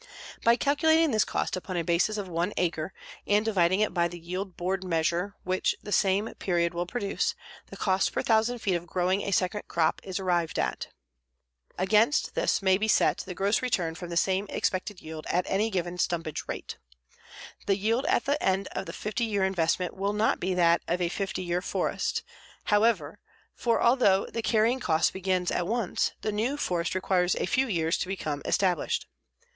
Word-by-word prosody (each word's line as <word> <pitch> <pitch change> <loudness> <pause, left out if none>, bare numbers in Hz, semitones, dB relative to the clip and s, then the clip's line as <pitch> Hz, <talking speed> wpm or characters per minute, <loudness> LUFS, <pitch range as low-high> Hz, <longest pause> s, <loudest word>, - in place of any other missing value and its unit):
By 235 +1 +5
calculating 315 +4 +3
this 215 -3 +3
cost - - -2
upon 185 0 -5
a 170 - 0
basis 175 +6 +1
of 200 -2 -4
one 175 +3 -1
acre, 165 -1 -1 0.4
and 205 +1 +3
dividing 190 -2 +2
it 215 - +1
by 170 -1 +2
the 175 +1 -8
yield 180 +3 -5
board 185 +2 -1
measure 175 +3 0
which 185 +1 0
the 205 - -7
same 200 +2 +2
period 170 -2 0
will 175 +1 -2
produce, 200 -1 -1 0.3
the - - -11
cost 190 -1 +1
per - - -2
thousand 225 +1 +1
feet 195 - +1
of 175 0 -2
growing 185 +3 0
a - - -3
second 195 +1 0
crop 165 -2 +1
is 190 0 -4
arrived 175 -3 0
at. - - -1 0.9
Against 215 - +2
this - - +1
may 190 0 +4
be 220 - 0
set - - +3
the 185 -2 -6
gross 200 +3 +1
return 180 -10 0
from 175 +1 -8
the 170 - -3
same 190 +3 +1
expected 185 +1 -2
yield 155 0 -8
at 180 +1 +1
any 210 +3 +1
given 180 -3 -3
stumpage 165 -4 -2
rate. - - -6 0.9
The 195 -1 +3
yield 230 +8 0
at 380 - +2
the 285 +2 0
end 190 +1 +1
of - - -5
a - - -6
50 215 +3 -3
year 205 -4 0
investment 180 -1 0
will 200 +1 -1
not 210 +1 +1
be 185 +1 -1
that 170 -1 +4
of 175 - 0
a 175 -1 0
50 190 0 -3
year 175 0 -1
forest, - - -1 0.4
however, 220 +2 +2 0.3
for 235 -1 +1
although 235 -6 +4
the 230 - -4
carrying 225 +3 +2
cost 160 -9 +2
begins 185 -1 0
at 175 - -1
once, 225 -3 0
the 215 - -1
new 230 +7 -1
forest 175 -10 -1
requires 185 -1 +1
a - - -1
few 260 +9 +1
years 165 -5 0
to - - -2
become 155 -6 -3
established. 180 -5 +1
190 Hz, 190 wpm, -28 LUFS, 175-215 Hz, 0.9 s, By